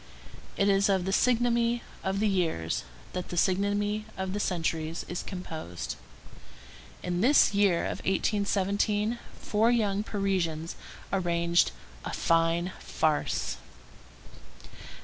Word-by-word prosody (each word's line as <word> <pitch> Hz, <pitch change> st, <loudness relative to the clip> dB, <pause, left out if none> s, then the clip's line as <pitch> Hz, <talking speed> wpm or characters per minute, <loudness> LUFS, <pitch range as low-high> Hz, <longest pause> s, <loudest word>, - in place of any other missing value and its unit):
It 200 Hz, -, +3 dB
is 195 Hz, 0 st, +4 dB
of 190 Hz, -2 st, +2 dB
the 190 Hz, -, -1 dB
physiognomy 235 Hz, 0 st, +2 dB, 0.2 s
of 190 Hz, +1 st, -1 dB
the 215 Hz, -, +2 dB
years 165 Hz, -, 0 dB, 0.3 s
that 180 Hz, -1 st, -4 dB
the 175 Hz, -, -4 dB
physiognomy 205 Hz, +3 st, +1 dB
of 190 Hz, 0 st, -3 dB
the 205 Hz, -, -2 dB
centuries 165 Hz, -3 st, -1 dB
is 175 Hz, -, -3 dB
composed. 160 Hz, -, -6 dB, 1.1 s
In 175 Hz, 0 st, -1 dB
this 260 Hz, -1 st, +5 dB
year 200 Hz, -4 st, +3 dB
of -, -, -3 dB
1817 205 Hz, +3 st, +1 dB, 0.2 s
four 220 Hz, +2 st, +2 dB
young 210 Hz, -4 st, +2 dB
Parisians 185 Hz, -6 st, -1 dB, 0.4 s
arranged 170 Hz, -2 st, +2 dB, 0.3 s
"a -, -, -5 dB
fine 165 Hz, +1 st, +2 dB
farce." 155 Hz, -2 st, 0 dB
195 Hz, 110 wpm, -29 LUFS, 170-205 Hz, 1.1 s, this